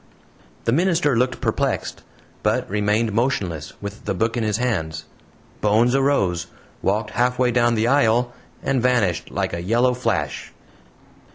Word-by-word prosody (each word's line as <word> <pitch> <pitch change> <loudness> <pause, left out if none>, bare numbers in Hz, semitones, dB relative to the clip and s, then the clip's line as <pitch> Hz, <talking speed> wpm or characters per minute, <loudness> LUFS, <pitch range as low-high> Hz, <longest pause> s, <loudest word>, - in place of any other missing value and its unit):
The 115 - +2
minister 165 -2 +2
looked 125 +1 0
perplexed, - - -1 0.4
but - - 0
remained 105 +2 0
motionless, 100 - -1
with 100 +1 -7
the 100 - -1
book 115 +4 0
in 120 - -1
his 105 -1 0
hands. 80 -10 -2 0.6
Bones 110 +4 +3
arose, 100 -12 +1 0.3
walked 105 +3 0
halfway 125 +1 +1
down 120 0 +3
the 110 0 +1
aisle, 120 -2 +3 0.3
and 135 -2 +1
vanished 105 -9 +1
like 95 -1 -2
a 85 - -3
yellow 120 +7 +2
flash! 125 0 -2
115 Hz, 135 wpm, -22 LUFS, 100-125 Hz, 0.6 s, Bones